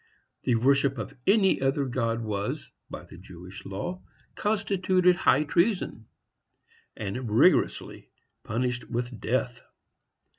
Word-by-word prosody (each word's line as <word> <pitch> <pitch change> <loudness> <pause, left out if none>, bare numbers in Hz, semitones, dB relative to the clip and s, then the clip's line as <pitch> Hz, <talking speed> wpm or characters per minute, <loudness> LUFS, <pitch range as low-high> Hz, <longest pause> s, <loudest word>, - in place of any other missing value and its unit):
The 125 - +3
worship 135 +3 +3
of 115 +4 -5
any 195 -4 +4
other 135 +1 +1
god 115 -2 -1
was, 100 -2 -3 0.2
by - - -7
the 85 - -13
Jewish 90 0 -11
law, 175 - -5 0.3
constituted 190 -3 +2
high 150 -5 +3
treason, 170 - 0 0.9
and 110 +4 -4
rigorously 130 +12 +2 0.3
punished 125 +2 -2
with 120 -1 -3
death. 125 0 -1
125 Hz, 110 wpm, -27 LUFS, 110-175 Hz, 0.9 s, any